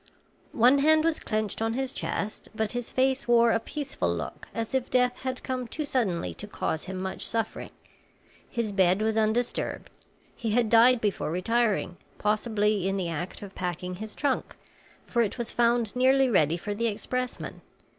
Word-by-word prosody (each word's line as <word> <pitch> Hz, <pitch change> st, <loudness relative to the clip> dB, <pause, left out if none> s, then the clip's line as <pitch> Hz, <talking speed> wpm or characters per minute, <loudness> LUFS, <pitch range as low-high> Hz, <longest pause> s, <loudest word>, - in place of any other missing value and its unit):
One 250 Hz, +4 st, +6 dB
hand 310 Hz, +2 st, +5 dB
was 330 Hz, -1 st, +1 dB
clenched 215 Hz, 0 st, -2 dB
on 225 Hz, 0 st, +1 dB
his 265 Hz, +2 st, -2 dB
chest, 210 Hz, -5 st, -3 dB
but 220 Hz, -1 st, -1 dB
his 245 Hz, -1 st, -3 dB
face 265 Hz, +1 st, +1 dB
wore 235 Hz, -1 st, +5 dB
a 225 Hz, -, +2 dB
peaceful 285 Hz, +4 st, -3 dB
look -, -, -5 dB
as 230 Hz, +2 st, -4 dB
if 260 Hz, -2 st, 0 dB
death 250 Hz, -1 st, +2 dB
had 260 Hz, -1 st, -4 dB
come 255 Hz, -2 st, -3 dB
too 305 Hz, -, -4 dB
suddenly 220 Hz, -, -1 dB
to 210 Hz, -, -6 dB
cause 160 Hz, -6 st, -3 dB
him 190 Hz, 0 st, -5 dB
much 190 Hz, 0 st, -4 dB
suffering. 225 Hz, -1 st, -3 dB, 0.8 s
His 230 Hz, -3 st, -2 dB
bed 190 Hz, +1 st, +3 dB
was 220 Hz, 0 st, +1 dB
undisturbed; 220 Hz, +2 st, 0 dB, 0.4 s
he 230 Hz, -, -3 dB
had 235 Hz, -1 st, +2 dB
died 235 Hz, +1 st, +6 dB
before 205 Hz, -7 st, -1 dB
retiring, 200 Hz, +1 st, 0 dB, 0.2 s
possibly 210 Hz, -2 st, +1 dB
in 195 Hz, 0 st, 0 dB
the 180 Hz, -3 st, -2 dB
act 170 Hz, +5 st, -5 dB
of 195 Hz, -1 st, -9 dB
packing 180 Hz, 0 st, -4 dB
his 215 Hz, +2 st, -7 dB
trunk, 280 Hz, -3 st, -1 dB, 0.5 s
for 235 Hz, -, +1 dB
it 220 Hz, 0 st, -1 dB
was 235 Hz, -2 st, -3 dB
found 235 Hz, -2 st, +2 dB
nearly 260 Hz, +1 st, +4 dB
ready 165 Hz, -4 st, +3 dB
for 205 Hz, +4 st, -4 dB
the 230 Hz, +3 st, 0 dB
expressman. 250 Hz, +4 st, -4 dB
225 Hz, 175 wpm, -27 LUFS, 205-250 Hz, 0.8 s, One